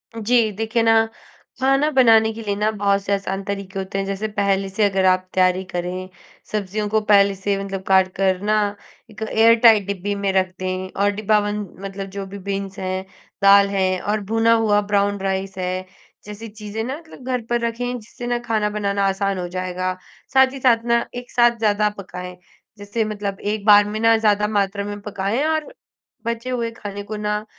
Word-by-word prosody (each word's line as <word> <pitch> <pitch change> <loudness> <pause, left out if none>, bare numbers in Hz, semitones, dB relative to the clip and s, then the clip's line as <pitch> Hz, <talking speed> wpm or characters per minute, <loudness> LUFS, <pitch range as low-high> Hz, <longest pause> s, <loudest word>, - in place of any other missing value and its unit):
जी, 225 0 +2
देखिए 225 +3 -1
ना, 225 0 +4 0.5
खाना 270 +3 +3
बनाने 225 -5 +5
के 225 - -8
लिए 205 -2 -2
ना, 210 +1 +1
बहुत 200 -1 +1
से 200 - -1
आसान 195 0 -2
तरीके 195 -1 -5
होते 190 0 -4
हैं। 195 - -1
जैसे 195 +2 -3
पहले 195 -1 +1
से 195 +3 -1
अगर 195 -1 +1
आप 185 0 +3
तैयारी 185 0 +2
करें, 180 +1 -4 0.4
सब्ज़ियों 210 0 -2
को 220 +1 +2
पहले 200 -1 +5
से 195 +1 -1
मतलब 195 -1 -5
काट 190 -1 +5
कर 190 -1 +1
ना, 210 -1 +1 0.4
एक 215 - -13
एयर-टाइट 225 -2 +5
डिब्बी 200 0 -2
में 200 -1 -1
रख 185 -1 +1
दें 185 0 -3
और 205 - +3
डिब्बाबंद, 210 -1 -1
मतलब 195 0 -6
जो 200 -1 -4
भी 195 +1 -9
बीन्स 195 -1 -3
हैं, 185 0 -3 0.4
दाल 200 0 +7
हैं 185 -2 0
और 210 +1 -1
भुना 225 0 +4
हुआ 215 -2 +3
ब्राउन 200 0 +2
राइस 190 0 -2
है, 185 0 -3 0.4
जैसी 210 +2 -8
चीज़ें 210 +1 -6
ना, 265 +5 -4
मतलब 320 -6 -14
घर 255 -2 -1
पर 240 0 +1
रखें, 245 +2 -3
जिससे 240 +3 -9
ना 240 0 0
खाना 215 -2 +1
बनाना 200 -1 -1
आसान 195 0 -1
हो 175 - -3
जाएगा। 185 0 -2 0.4
साथ 265 0 +5
ही 275 - -7
साथ 235 -3 +3
ना, 235 0 +2
एक 245 0 -7
साथ 240 -1 +3
ज़्यादा 210 -1 +2
पकाएँ। 180 -1 -8 0.4
जैसे 205 +3 -2
मतलब 205 -2 -4
एक 210 0 -3
बार 205 -1 +7
में 215 +1 -4
ना, 225 0 +5
ज़्यादा 210 -1 +2
मात्रा 200 -1 0
में 205 0 -5
पकाएँ 200 +5 -2
और 315 -1 -1 0.5
बचे 235 +2 -3
हुए 235 -2 -2
खाने 205 -2 -7
को 215 +1 -6
ना, 210 0 -2
205 Hz, 190 wpm, -21 LUFS, 195-225 Hz, 0.5 s, दाल